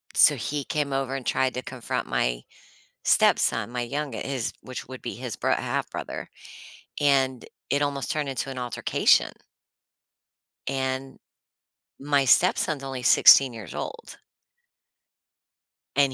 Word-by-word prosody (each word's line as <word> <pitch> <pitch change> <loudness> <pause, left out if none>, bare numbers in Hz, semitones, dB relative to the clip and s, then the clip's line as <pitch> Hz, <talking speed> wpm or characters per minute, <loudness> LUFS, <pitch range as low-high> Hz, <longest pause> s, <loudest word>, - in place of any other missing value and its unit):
so, - - +6
he 145 -1 -3
came 150 -1 -2
over 135 -1 -2
and 130 - -6
tried 130 -1 +1
to 125 - -4
confront 125 -3 -4
my - - -1 0.6
stepson, - - +3
my 120 0 -3
younge 140 +4 -4
his 130 -4 -3
which 130 -1 -8
would 130 -1 -9
be 120 - -6
his 125 -3 -6
bro - - +1
half - - -2
brother, - - -6 0.7
and 135 -3 +2 0.2
it 140 +1 +1
almost 140 -3 -2
turned 150 -3 -2
into 135 0 -3
an 130 - -7
altercation 125 -1 +2 1.3
and 130 0 -3 0.8
my 140 -1 +1
stepson's 150 -1 +3
only 135 -2 -5
16 130 +1 +7
years 110 -3 -9
old. 470 0 -7 1.8
And 140 -2 +3
135 Hz, 130 wpm, -25 LUFS, 125-140 Hz, 1.8 s, 16